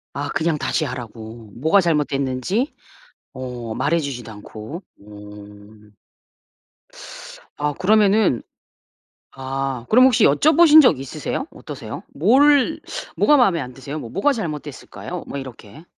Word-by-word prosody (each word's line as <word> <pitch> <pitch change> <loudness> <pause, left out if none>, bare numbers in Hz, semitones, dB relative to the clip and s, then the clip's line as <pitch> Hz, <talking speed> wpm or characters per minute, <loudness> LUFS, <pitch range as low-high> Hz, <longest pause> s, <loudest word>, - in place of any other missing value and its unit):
아 145 +1 -4
그냥 160 -1 -1
다시 - - -1
하라고. 115 -3 -8
뭐가 160 +10 +3
잘못됐는지 150 - -1 0.6
어 125 -3 -6
말해주지도 140 -7 -2
않고. 110 - -9 0.2
어. 105 0 -14 1.6
아 145 0 -1
그러면은 200 - +3 0.9
아 135 -2 -4
그럼 250 +4 +6
혹시 245 -4 +3
여쭤보신 310 - +6
적 205 - +4
있으세요? 135 - -5
어떠세요? - - -9
"뭘 285 - +3 0.4
뭐가 295 - +4
마음에 195 - +3
안 130 -2 -7
드세요? 140 +3 -7
뭐 120 -6 -8
뭐가 200 - +1
잘못됐을까요?" 160 - -7
뭐 140 - -6
이렇게. 130 +1 -11
140 Hz, 265 characters per minute, -21 LUFS, 120-195 Hz, 1.6 s, 그럼